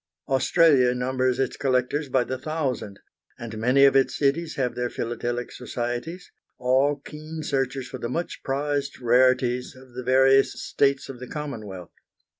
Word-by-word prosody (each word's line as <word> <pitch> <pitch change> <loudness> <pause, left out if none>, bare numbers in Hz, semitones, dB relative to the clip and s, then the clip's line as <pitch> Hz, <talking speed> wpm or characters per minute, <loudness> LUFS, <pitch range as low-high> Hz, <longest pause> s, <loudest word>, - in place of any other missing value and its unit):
Australia 135 -2 +4
numbers 130 0 0
its 135 - -1
collectors 135 +2 0
by 130 -1 +2
the 130 +1 -4
thousand, 130 -9 -3 0.4
and 115 -2 -7
many 130 +5 +5
of 135 -1 +4
its 130 -1 +3
cities 150 +4 0
have 125 -3 -1
their 125 0 -2
philatelic 120 +1 -3
societies, 125 +8 -5 0.3
all 130 +3 +2
keen 155 +2 -8
searchers 135 -2 -1
for 130 - -8
the 120 - -4
much 170 +7 -4
prized 140 +1 -2
rarities 125 0 +2
of 130 -1 -16
the 125 - -5
various 135 +2 +4
States 140 -1 +1
of 135 -3 -9
the 125 - -8
Commonwealth. 110 - -7
130 Hz, 150 wpm, -25 LUFS, 125-140 Hz, 0.4 s, many